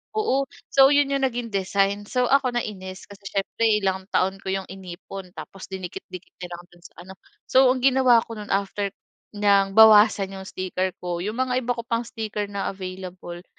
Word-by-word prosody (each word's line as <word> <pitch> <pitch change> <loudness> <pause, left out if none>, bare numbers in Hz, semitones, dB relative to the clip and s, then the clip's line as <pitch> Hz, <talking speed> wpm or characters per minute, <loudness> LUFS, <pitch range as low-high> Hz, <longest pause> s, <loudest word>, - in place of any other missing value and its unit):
oo 275 -11 +1 0.2
so 270 0 +7
'yon 285 0 +3
'yong 275 - +1
naging 235 -2 -5
design. 200 +1 0
So 250 -1 0
ako 260 -3 +3
nainis 190 -5 -5
kasi 200 0 -11
siyempre 200 +4 -1 0.2
ilang 190 0 -1
taon 190 0 0
ko - - -13
'yong 190 -1 -3
inipon 190 0 -9
tapos 195 - -9
dinikit-dikit 185 -1 -8
niya 180 - -6
lang 175 - -12
do'n 175 - -20
sa - - -13
ano. 190 - -11 0.3
So 260 0 +4
ang 255 0 +1
ginawa 255 -3 +5
ko 225 -2 -9
no'n 210 - -8
after 200 0 -2 0.5
niyang 200 -1 +3
bawasan 210 -3 +7
'yong 190 0 -8
sticker 185 0 -3
ko, 175 -1 -3
'yong 210 +5 -3
mga 255 0 0
iba 245 0 -2
ko 235 - -5
pang 230 0 -2
sticker 215 -2 -4
na 200 -1 -3
available 185 -2 -8
200 Hz, 185 wpm, -24 LUFS, 190-235 Hz, 0.5 s, so